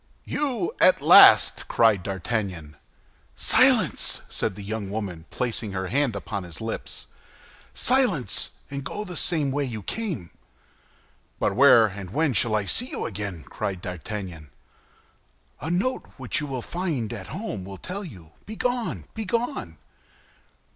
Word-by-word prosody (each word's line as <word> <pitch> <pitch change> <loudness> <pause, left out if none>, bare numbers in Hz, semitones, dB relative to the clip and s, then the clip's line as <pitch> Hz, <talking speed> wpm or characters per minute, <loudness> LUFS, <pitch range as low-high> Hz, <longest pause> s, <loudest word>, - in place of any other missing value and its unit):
"You 295 - -2
at - - +6
last?" - - +7
cried 110 -5 +3
D'Artagnan. 95 -5 -3 0.6
"Silence!" - - +3
said 100 - -2
the 100 - -8
young 105 -1 -4
woman, 95 -6 -5
placing 115 -4 -3
her 95 -1 -3
hand 135 -1 +1
upon 100 0 -4
his 90 -3 -9
lips; 110 0 -5 0.7
"silence, 235 - +2 0.2
and 140 0 -4
go 210 +9 -4
the 180 -2 -7
same 155 -5 +2
way 145 +2 0
you 115 -6 -5
came!" 175 - -4 1.1
"But - - 0
where 115 -1 +7
and 100 -3 -6
when 150 - +1
shall 110 +1 +2
I 105 -2 0
see 245 - +3
you - - -4
again?" 100 -6 -5
cried 95 -3 -4
D'Artagnan. 90 -3 -6 1.1
"A 150 - -5
note 195 +10 -1
which 130 -3 -1
you 150 - -4
will 130 -3 -4
find 155 - -3
at 95 -5 -7
home 185 - -5
will 95 +1 -8
tell 195 - -6
you. 90 - -11 0.2
Begone, 245 +2 -2
begone!" 225 - -3
115 Hz, 140 wpm, -25 LUFS, -, 1.1 s, last